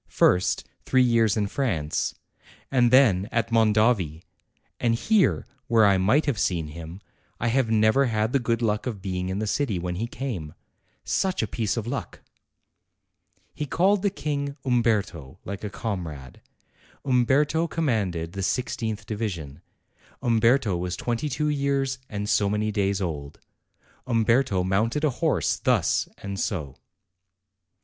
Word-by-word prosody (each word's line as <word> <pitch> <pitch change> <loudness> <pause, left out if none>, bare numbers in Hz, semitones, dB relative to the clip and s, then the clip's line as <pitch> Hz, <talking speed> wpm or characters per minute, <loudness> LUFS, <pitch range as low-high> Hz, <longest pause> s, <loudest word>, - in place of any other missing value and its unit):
First, 90 +1 +2 0.2
three 130 -1 +3
years 115 -3 +3
in 105 - +1
France, 100 - -1 0.6
and 125 -3 +4
then 115 -6 +4
at 115 -1 -1
Mondovi, 110 -7 +2 0.6
and 115 -2 +2
here, 210 - +2 0.2
where 115 -2 +5
I 100 -2 +4
might 110 +12 +3
have 135 -9 -1
seen 85 -3 0
him, 85 +4 -9 0.4
I 120 - 0
have 125 -1 +1
never 110 +5 +4
had 110 +1 0
the 140 - +3
good 115 -1 -1
luck 105 +1 0
of 110 -5 -4
being 90 -1 -3
in 95 - -2
the 110 - -1
city 110 -1 0
when 90 0 -3
he 115 +4 -2
came. 100 - -5 0.5
Such 190 -9 0
a - - -1
piece 110 +1 -2
of 110 - -2
luck!" 120 - -5 1.3
He 150 - -4
called 185 +6 +2
the 200 - +2
King 145 -4 -3
"Umberto," 105 - 0
like 100 +2 -6
a 105 - -3
comrade. 85 - -6 0.6
Umberto 140 +6 +2
commanded 100 - -1
the 100 - -4
i6th 110 0 -2
division; 90 -9 -5 0.6
Umberto 115 -2 +3
was 90 +1 -3
twenty 120 +5 -2
two 150 +3 -1
years 140 -2 0
and 105 0 -4
so 100 -1 +2
many 105 +1 0
days 100 -1 0
old; 75 -4 -5 0.7
Umberto 115 -4 +2
mounted 110 +10 0
a 150 - +3
horse 125 - 0
thus - - +1
and 100 -1 -4
o. 75 -9 -5
110 Hz, 145 wpm, -25 LUFS, 95-130 Hz, 1.3 s, where